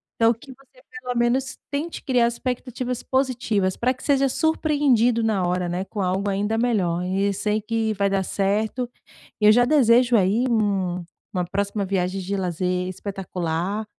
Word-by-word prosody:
Então, 230 +1 +4
que 250 +4 -14
você, 275 - -23 0.2
pelo 250 - -4
menos, 250 +2 0
tente 300 +4 -4
criar 245 -3 +3
expectativas 250 0 -4
positivas, 235 -8 0
pra 255 +2 +1
que 255 - -17
seja 275 -2 +2
surpreendido 285 -7 +2
na 205 -5 +1
hora, 180 0 0
né, 180 +2 -2
com 205 -1 -5
algo 190 +2 0
ainda 205 +3 0
melhor 190 -8 +1
e, 195 +2 0
sei 210 +2 -1
que 220 0 -1
vai 200 0 +1
dar 195 -1 0
certo. 215 +6 -1 0.5
E, - - +3
eu - - +9
já 245 +2 +5
desejo, 245 -3 +4
aí, 210 +5 +3
uma, 220 -3 +2 0.7
uma 180 -1 -1
próxima 200 +2 -2
viagem 190 0 -1
de 195 +2 -3
lazer 180 0 -1
espetacular 185 +1 -3
215 Hz, 165 wpm, -23 LUFS, 190-245 Hz, 0.7 s, eu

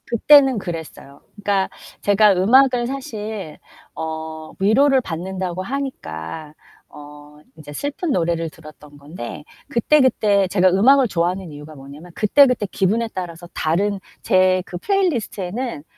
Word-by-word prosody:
그때는 270 +2 +5
그랬어요. 160 -6 -8
그러니까 200 -2 -1 0.3
제가 205 0 +4
음악을 245 +6 +3
사실 220 - -6 0.4
어 160 0 -6
위로를 260 +7 +3
받는다고 185 0 -5
하니까 155 - -6 0.4
어 150 0 -14 0.2
이제 150 -2 -11
슬픈 285 - -4
노래를 165 -4 -1
들었던 150 -2 -15
건데 145 -2 -9 0.3
그때, 290 +6 +3
그때 205 -6 +2
제가 185 -1 +3
음악을 250 +8 +4
좋아하는 180 -1 -2
이유가 150 +1 -11
뭐냐면 145 +5 -12
그때, 250 +7 +5
그때 250 -5 -1
기분에 220 +5 0
따라서 175 -2 -7
다른 195 +6 -1 0.2
제 185 0 +3
그 175 - -7
플레이리스트에는 240 - -2
190 Hz, 310 characters per minute, -20 LUFS, 160-235 Hz, 0.4 s, 그때는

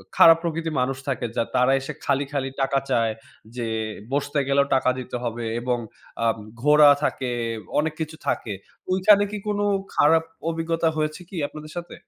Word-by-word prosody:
খারাপ 165 0 +8
প্রকৃতির 165 -1 -2
মানুষ 135 +1 -1
থাকে, 130 -3 -1
যা - - +3
তারা 125 +1 +4
এসে 135 +3 -6
খালি, 140 0 +1
খালি 135 -2 -1
টাকা 135 0 +2
চায়। 115 -3 +2 0.4
যে 120 - -2 0.5
বসতে 145 +1 -1
গেলেও 140 0 +3
টাকা 130 -1 +2
দিতে 125 0 -6
হবে 115 0 -3
এবং 125 0 0 0.5
আ - - +2 0.4
ঘোড়া 150 +1 +7
থাকে, 130 -3 -1 0.5
অনেক 155 0 0
কিছু 160 0 -4
থাকে। 105 - -1 0.4
ঐখানে 200 +2 +5
কি 210 - -3
কোন 205 -1 0 0.4
খারাপ 160 +2 +5 0.3
অভিজ্ঞতা 165 0 0
হয়েছে 155 +2 -2
কি - - -10
আপনাদের 155 +1 -10
সাথে? 175 0 -6
145 Hz, 165 wpm, -24 LUFS, 130-165 Hz, 0.5 s, খারাপ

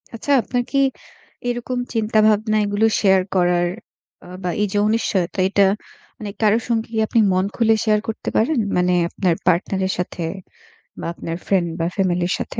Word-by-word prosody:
আচ্ছা 285 +5 -3
আপনার 245 +3 -2
কি 275 -1 +2 0.7
এরকম 245 +1 -3 0.2
চিন্তা 220 -1 +1
ভাবনা 215 0 +2
এগুলো 205 +2 +1
শেয়ার 190 -2 +4
করার 175 -1 +2 0.6
আ - - -12
বা, 180 - -1
এইযে 205 0 -1
অনিশ্চয়তা, 200 -5 0
এটা 200 -1 +4 0.5
মানে 210 -2 -6
কারো 215 0 +4
সঙ্গে 230 -2 0
কি - - -2
আপনি 230 - +2
মন 185 +1 +1
খুলে 225 -1 +3
শেয়ার 215 -1 +3
করতে 225 - -4
পারেন? 255 +4 +2 0.2
মানে 180 0 +2 0.2
আপনার 180 -1 0
পার্টনারের 190 +2 +1
সাথে 180 -1 -4 0.8
বা, - - -6
আপনার 165 -1 -5
ফ্রেন্ড 185 -3 +1
বা, 165 - 0
ফ্যামিলির 180 -2 0
সাথে? - - -5
205 Hz, 160 wpm, -20 LUFS, 180-220 Hz, 0.8 s, শেয়ার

